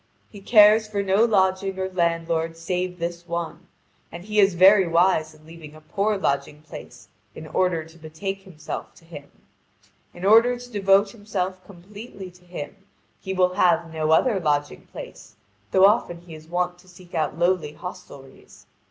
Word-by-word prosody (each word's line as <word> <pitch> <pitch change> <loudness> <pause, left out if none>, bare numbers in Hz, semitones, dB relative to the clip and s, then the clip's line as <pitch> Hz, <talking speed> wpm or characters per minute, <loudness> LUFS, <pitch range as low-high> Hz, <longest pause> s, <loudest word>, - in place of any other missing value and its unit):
He 205 - -12
cares 215 +1 +6
for 205 -1 -2
no 195 +3 +3
lodging 190 -3 +1
or 190 0 -2
landlord 165 -2 -1
save 180 +2 -3
this 170 0 -5
one, 170 -1 -5 0.4
and 175 - -9
he 210 +1 -1
is 195 -2 +4
very 190 +1 +6
wise 165 -2 +2
in 155 0 -21
leaving 160 -2 -12
a 155 - -14
poor 205 +6 -1
lodging 145 -3 -2
place 155 - -12 0.3
in 155 - -9
order 170 0 0
to 165 +1 -18
betake 175 +5 -6
himself 165 -5 -8
to 165 - -20
him. 145 -4 -11 0.8
In 175 +2 -8
order 230 +4 +5
to 245 0 -12
devote 200 -1 +3
himself 190 -4 -4
completely 200 +1 -11
to 180 0 -22
him, 175 -1 -8 0.4
he 190 -1 -5
will 180 -1 +2
have 170 -3 +2
no 155 -1 -2
other 195 +6 +3
lodging 145 -3 -2
place, - - -11 0.3
though 190 0 +5
often 195 -5 +1
he 175 -2 -13
is 155 0 -12
wont 180 +1 -2
to 185 - -21
seek 180 -1 -17
out 155 -1 -2
lowly 175 -3 0
hostelries. 140 -5 -12
180 Hz, 170 wpm, -23 LUFS, 165-195 Hz, 0.8 s, cares